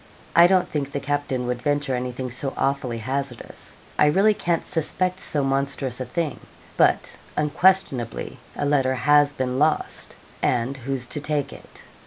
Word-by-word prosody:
I 170 +1 +8
don't 185 -1 +3
think 140 -2 -3
the 140 - -2
captain 140 -3 -2
would 125 0 -2
venture 145 0 0
anything 125 0 -3
so 135 +2 -3
awfully 135 -3 0
hazardous. 130 +2 -5 0.3
I 150 - +6
really 195 +8 +4
can't 170 -4 -1
suspect 185 +2 -1
so 145 -6 -1
monstrous 135 -1 -1
a - - -2
thing; 150 +5 -2 0.4
but, - - +2 0.2
unquestionably, 150 - +1 0.2
a - - -2
letter 135 -2 +2
has 145 +3 +4
been 130 -2 -2
lost 155 +1 0 0.3
and 125 +2 +1
who's 130 0 -3
to 150 - -4
take 145 -1 -1
it?' - - -13
140 Hz, 155 wpm, -24 LUFS, 130-150 Hz, 0.4 s, I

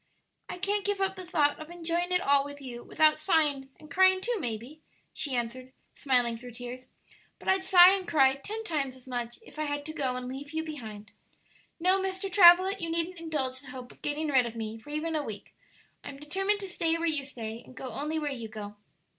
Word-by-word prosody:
"I - - -5
can't 400 +2 0
give 410 0 -1
up 385 0 0
the 370 -2 -8
thought 295 -4 +2
of 310 +1 -9
enjoying 345 +1 -1
it 360 0 +3
all 280 -2 +4
with 285 0 -9
you 245 -3 -8
without 310 0 +3
sighing, 295 -5 +1
and 305 -2 -15
crying, 375 0 +5
too, 475 +5 -1
maybe," 245 - -5 0.3
she 275 -4 -2
answered, 250 +2 -4 0.2
smiling 245 -4 +1
through 245 0 -10
tears; 245 +2 -8 0.5
"but - - -14
I'd 380 0 +3
sigh 365 -1 +9
and 380 -2 -1
cry 270 -4 +5
ten 430 +10 -6
times 285 -9 -2
as 255 - -17
much 240 -2 -4
if 310 - -13
I 305 - 0
had 290 0 -3
to 310 - -6
go 270 -5 -1
and 250 0 -5
leave 280 +4 -7
you 320 0 -1
behind. 220 -9 -8 0.7
No, 370 +3 +3
Mr. 385 +1 -3
Travilla, 370 0 +8
you 335 - -4
needn't 335 +2 -2
indulge 280 -6 -2
the 275 - -11
hope 250 -1 -9
of - - -20
getting 295 +1 -2
rid 260 -4 +4
of 235 - -8
me 225 0 -5
for 260 - -15
even 310 +2 -2
a 300 - 0
week. 210 -6 -8 0.5
I'm 280 - -8
determined 390 +8 -1
to 390 - -5
stay 330 -2 +1
where 335 - -2
you 305 -4 +1
stay, 230 -4 -7
and 255 - -16
go 260 - -6
only 300 +7 -3
where 300 -2 -2
you 235 -4 -5
go." 210 -1 -8
295 Hz, 220 wpm, -29 LUFS, 255-350 Hz, 0.7 s, sigh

